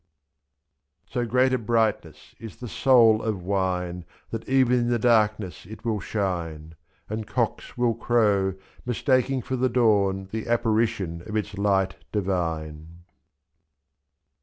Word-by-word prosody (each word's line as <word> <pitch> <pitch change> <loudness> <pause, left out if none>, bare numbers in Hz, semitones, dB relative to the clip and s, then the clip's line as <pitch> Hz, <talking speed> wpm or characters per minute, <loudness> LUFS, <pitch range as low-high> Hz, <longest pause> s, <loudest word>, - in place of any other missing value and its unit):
So 120 -1 -1
great 130 +3 +3
a 130 - +1
brightness 115 -2 -1
is 110 -3 -9
the 125 - -8
soul 115 -3 +4
of 105 -5 -3
wine 90 -2 -1 0.3
That 115 +2 -5
even 130 -2 +4
in 120 0 0
the 120 - +2
darkness 105 -6 +1
it 110 +3 -11
will 110 -3 0
shine, 85 -5 -3 0.3
^^I'And 110 0 -5
cocks 120 0 -2
will 120 -1 +2
crow, 105 -5 +1 0.3
mistaking 130 +1 +1
for 130 - -3
the 130 +1 +1
dawn 100 -5 +2
The 110 +1 -4
apparition 110 -7 0
of 110 - -5
its 105 -1 -2
light 95 -2 +1
divine. 85 -4 -3
110 Hz, 130 wpm, -25 LUFS, 95-120 Hz, 0.3 s, soul